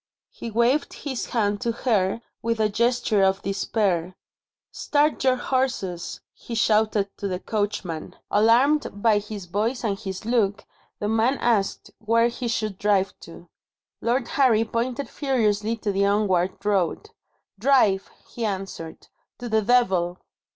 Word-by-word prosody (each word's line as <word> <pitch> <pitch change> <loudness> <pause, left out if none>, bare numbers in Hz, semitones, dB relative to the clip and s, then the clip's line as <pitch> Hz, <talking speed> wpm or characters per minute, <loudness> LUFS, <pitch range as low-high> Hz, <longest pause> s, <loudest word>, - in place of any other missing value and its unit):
He 235 - -7
waved 235 +6 +1
his 265 -4 -4
hand 205 -4 0
to 235 - 0
her 225 -2 0 0.2
with 230 0 -1
a 215 -1 +3
gesture 235 -1 +1
of 190 0 +2
despair. 195 -3 -1 0.6
"Start 295 0 +1
your 260 -1 +4
horses," 250 -9 -2
he 235 - -8
shouted 215 -2 +2
to 200 - -3
the 180 -2 -3
coachman. 205 -6 -3 0.2
Alarmed 230 +2 +3
by 220 -3 +5
his 205 -2 -7
voice 215 +8 -1
and 200 -3 -1
his 190 -1 -6
look, 220 -4 +1 0.3
the 205 - -3
man 225 +5 +2
asked 220 -5 0
where 230 +2 +3
he 240 +1 -5
should 215 -4 -2
drive 200 -2 +2
to. 170 +1 -13 0.5
Lord 240 +1 0
Harry 230 -5 +3
pointed 245 +4 -2
furiously 225 -6 0
to 215 -2 -2
the 200 0 +2
onward 195 -2 +1
road. 205 - 0 0.5
"Drive," 220 -6 +3 0.2
he 235 - -6
answered, 190 -6 -5 0.3
"to 245 - -6
the 220 -1 +2
Devil!" 190 -7 +2
215 Hz, 140 wpm, -24 LUFS, 195-235 Hz, 0.6 s, by